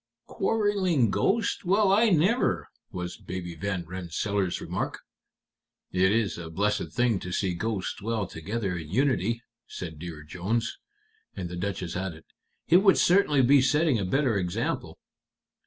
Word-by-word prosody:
"Quarreling 190 - +1
ghosts! 210 - +1
Well, 195 +2 +3
I 220 +3 +5
never!" 195 +8 +2 0.2
was 90 -1 -5
Baby 90 -2 -6
Van 90 +1 -3
Rensselaer's 95 +2 -2
remark. - - -3 0.9
"It 95 +1 +3
is 110 -4 0
a 80 -1 -7
blessed 105 +5 0
thing 120 -5 +1
to 90 - -6
see 95 0 0
ghosts 100 +1 -3
dwell 110 0 -1
together 95 +3 -3
in 80 -3 -6
unity," 115 - +1 0.2
said 80 -4 -7
Dear 80 -2 -7
Jones. 100 +9 -2 0.6
And 90 -2 -4
the 90 - -6
Duchess 90 -1 -3
added, 90 -4 -4 0.4
"It 175 - +7
would 195 0 +5
certainly 170 -7 +4
be 135 +2 +6
setting 150 -2 +3
a - - -1
better 120 +2 +1
example." 90 -1 -2
100 Hz, 140 wpm, -27 LUFS, 90-140 Hz, 0.9 s, It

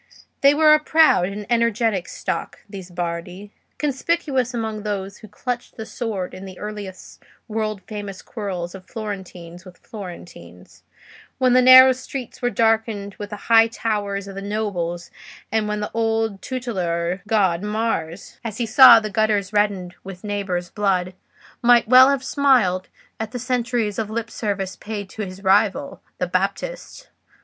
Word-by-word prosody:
They 280 +1 +6
were 305 0 +6
a 305 - +5
proud 310 - +4
and 205 +2 -6
energetic 230 -5 +1
stock, - - -5
these 195 -3 -9
Bardi; 175 +3 -5 0.3
conspicuous 280 -3 -1
among 220 -3 -4
those 200 -1 -4
who 215 - -12
clutched 245 +4 -5
the 220 - -6
sword 210 -6 -4
in 190 - -9
the 185 -1 -10
earliest 210 -3 -8 0.3
world 215 -3 -3
famous 205 -2 -7
quarrels 185 -6 -5
of 185 -1 -12
Florentines 185 -5 -7
with 185 -1 -14
Florentines, 170 - -11 0.6
when 255 -1 +3
the 255 - +6
narrow 255 +1 +9
streets 260 -1 -7
were 245 - +1
darkened 220 -3 0
with 205 -1 -6
the 210 - -5
high 225 -1 +6
towers 205 -3 -3
of 195 - -8
the 195 - -6
nobles, 195 -5 -3 0.4
and 220 -1 0
when 210 0 -2
the 210 - -4
old 225 -3 -1
tutelar 185 -8 -3
god 190 -6 +2
Mars, 210 -5 -3
as 220 -3 -5
he 240 - -1
saw 240 +1 +9
the 215 - -4
gutters 210 -1 0
reddened 200 -4 0
with 190 0 -10
neighbours' 195 -4 -3
blood, 185 -3 0 0.5
might 240 -1 +5
well 255 +3 +8
have 275 -2 0
smiled 250 -10 +2 0.3
at 220 -1 -3
the - - -3
centuries 240 -4 -1
of 215 -2 -2
lip 230 +1 -4
service 200 -3 -3
paid 205 -3 -7
to 215 - -6
his 190 -1 -7
rival, 205 +8 +1 0.2
the - - -1
Baptist. - - -3
210 Hz, 155 wpm, -22 LUFS, 190-235 Hz, 0.6 s, narrow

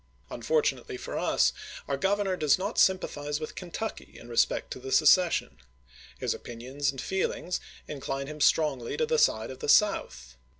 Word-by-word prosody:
Unfortunately 465 -3 -1
for - - -7
us, - - +2 0.3
our - - 0
Governor 195 -1 0
does 150 -5 +3
not 185 - -2
sympathize 150 -6 +1
with 155 - -6
Kentucky 190 +5 -6
in 120 - -13
respect 115 - +1
to - - -5
the 130 +1 -7
secession. 170 - +4 0.6
His - - -1
opinions 130 +4 -4
and 135 - -4
feelings 180 0 -2 0.3
incline 135 -1 -4
him 150 +1 -8
strongly 140 -8 +2
to 470 - +2
the 470 0 +1
side - - +2
of - - -10
the 450 - -4
South. 65 - +2
155 Hz, 160 wpm, -28 LUFS, 135-195 Hz, 0.6 s, secession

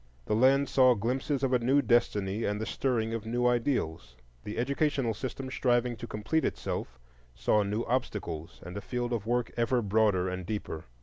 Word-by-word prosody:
The - - -1
land 135 +4 +4
saw 130 -1 +5
glimpses 130 +6 -1
of 130 -1 +1
a 125 - +4
new 130 +4 +3
destiny 105 -3 +1
and 105 0 -1
the 110 - -2
stirring 115 -4 -1
of 115 -1 -4
new 120 +2 0
ideals. 120 - 0 0.3
The 105 - -5
educational 140 -1 +1
system 130 +4 -5
striving 120 -2 +1
to 120 - -7
complete 110 +11 -1
itself 60 - -3 0.4
saw 60 - +2
new 105 +3 -1
obstacles 105 -10 -3
and 90 +2 -8
a 100 - -4
field 120 +1 -3
of 110 -2 -3
work 120 0 0
ever 120 +1 +2
broader 105 -3 +2
and 90 0 -3
deeper. 90 -5 -5
115 Hz, 180 wpm, -29 LUFS, 105-125 Hz, 0.4 s, saw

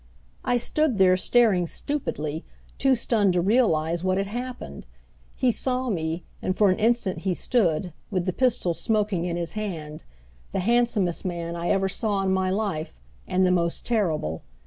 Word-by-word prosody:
I 245 - +2
stood 270 +1 0
there, 185 -1 +5
staring 190 -3 +3
stupidly, 160 - -3 0.4
too 270 -1 +4
stunned 215 -5 +2
to 175 - +2
realize 170 -6 +2
what 185 0 +1
had 195 - 0
happened. 245 +4 -6 0.5
He 255 -2 +3
saw 255 +1 -1
me, 165 -2 -2 0.2
and 185 - -1
for 205 -3 +5
an 185 - -1
instant 225 -4 +1
he 190 -2 -1
stood, 180 - +1 0.2
with 185 -4 -1
the 185 - -1
pistol 245 -8 +1
smoking 205 -2 0
in 175 -1 -2
his 170 -1 -3
hand 165 -8 -5 0.5
the - - 0
handsomest 225 -4 +1
man 170 -2 -3
I 170 0 -2
ever 195 -1 +2
saw 200 0 -1
in 190 - +1
my 190 0 +1
life, 190 - -2 0.3
and 185 +1 +2
the 180 - +3
most 170 -2 0
terrible. 160 - 0
190 Hz, 170 wpm, -25 LUFS, 170-230 Hz, 0.5 s, there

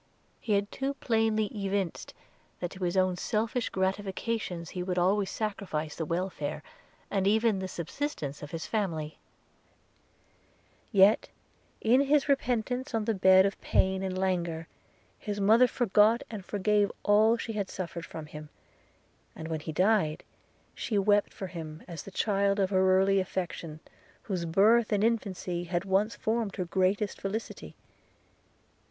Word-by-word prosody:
He 220 - -1
had 200 0 +1
too 275 +1 -2
plainly 225 -4 +1
evinced, 195 -3 -3 0.4
that 175 - -3
to 190 -1 -7
his 175 +2 -1
own 185 -1 +2
selfish 225 +5 -1
gratifications 190 -1 -2
he 180 - -4
would 180 0 -2
always 190 +3 +2
sacrifice 185 -8 -3
the 160 - -3
welfare, 170 -4 -3 0.5
and 195 -1 +1
even 220 -1 +3
the 190 - -3
subsistence 170 - -4
of 150 - -7
his 165 0 -5
family; 165 -8 -2 1.7
yet, 200 0 +5 0.5
in 245 +4 +4
his 285 +1 +2
repentance 255 -1 0
on 220 -2 0
the 225 - +1
bed 190 -1 +6
of 200 - -2
pain 190 0 +1
and 190 -1 -3
languor, 175 -4 -1 0.5
his 205 -1 -4
mother 225 +5 +6
forgot 225 -1 +3
and 210 -4 -6
forgave 205 0 +1
all 215 +3 +4
she 230 0 -5
had 205 -3 -2
suffered 170 -2 -5
from 160 -1 -7
him; 150 0 -10 0.9
and 160 0 -7
when 160 -1 -2
he 160 - -6
died, 185 -2 +2 0.5
she 215 - -2
wept 205 +1 +3
for 195 - -6
him 165 -3 -8
as 170 -3 -6
the - - -10
child 200 0 +1
of 195 0 +1
her 185 -1 +4
early 195 +1 +3
affection, 175 -4 -4 0.4
whose 185 -5 -3
birth 210 +7 +4
and 205 -1 +2
infancy 190 -6 -1
had 175 +2 -2
once 195 +3 +1
formed 220 -2 -1
her 185 - -2
greatest 190 +3 0
felicity. 205 +4 -5
195 Hz, 145 wpm, -29 LUFS, 180-215 Hz, 1.7 s, bed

